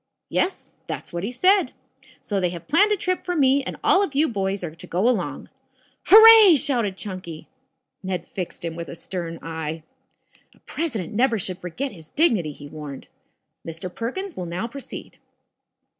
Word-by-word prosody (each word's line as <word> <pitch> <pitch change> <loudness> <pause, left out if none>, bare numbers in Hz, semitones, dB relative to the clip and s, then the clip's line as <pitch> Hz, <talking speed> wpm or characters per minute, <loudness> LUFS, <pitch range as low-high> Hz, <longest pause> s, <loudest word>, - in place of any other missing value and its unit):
"Yes. 370 - -1 0.2
That's - - -6
what 170 +1 -3
he 205 - -2
said. 370 +3 +3 0.5
So 200 -2 -1
they 180 -2 +1
have 170 -1 -9
planned 340 +9 +4
a 420 - +2
trip 365 0 -2
for 355 - -2
me 275 -2 +4
and 260 - -6
all 385 - +5
of 320 -9 -2
you 305 +3 +3
boys 195 -4 -2
are 160 -3 -5
to 165 - -12
go 185 +7 +1
along." 250 - -1 0.6
"Hooray!" 440 -3 +9
shouted 240 -9 0
Chunky. 185 -6 -8 0.5
Ned 185 -2 -4
fixed 180 -2 -6
him 165 -1 -4
with 170 -1 -6
a - - -7
stern 170 -1 -5
eye. 160 -1 -5 0.7
"A - - -26
president 230 - -4
never 235 +1 +2
should 185 -2 -4
forget 250 +11 -4
his 160 -4 -14
dignity," 220 - +2
he 145 0 -11
warned. 145 -2 -9 0.5
"Mr. 165 +2 -7
Perkins 360 +11 -5
will 180 - -5
now 175 +5 -3
proceed." 275 +3 -10
200 Hz, 175 wpm, -23 LUFS, -, 0.7 s, Hooray